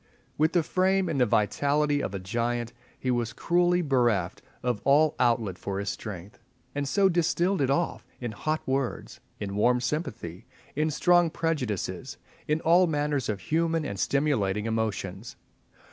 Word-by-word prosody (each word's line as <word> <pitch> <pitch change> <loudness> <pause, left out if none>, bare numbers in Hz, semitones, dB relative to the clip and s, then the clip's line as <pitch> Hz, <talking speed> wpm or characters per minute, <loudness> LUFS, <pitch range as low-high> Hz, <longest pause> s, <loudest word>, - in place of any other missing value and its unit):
With 155 +1 +2
the 175 -2 +3
frame 190 +2 +1
and 140 -5 0
the 125 - +4
vitality 145 +8 +1
of 100 - -3
a - - -3
giant 120 +4 -2 0.2
he 130 - -1
was 120 -1 -1
cruelly 175 +3 +2
bereft 120 - +1 0.2
of 120 -4 -1
all 150 +3 +4
outlet 115 -7 +1
for 100 -1 -4
his 100 0 -2
strength, 105 +1 -8 0.3
and 145 0 -2
so 195 +6 +3
distilled 175 0 +1
it 135 - +2
off 155 +5 0 0.2
in 120 -2 -4
hot 155 +9 -3
words, 130 -1 -2 0.2
in 100 -1 -4
warm 125 +4 +3
sympathy, 120 - -4 0.3
in 155 +2 +1
strong 175 +2 +4
prejudices, 130 - -3 0.3
in 150 +1 +1
all 175 +3 +5
manner 150 -2 0
of 105 -2 -2
human 165 0 0
and 100 -6 -5
stimulating 110 -9 +1
emotions. 110 -2 -3
135 Hz, 155 wpm, -27 LUFS, 110-160 Hz, 0.3 s, all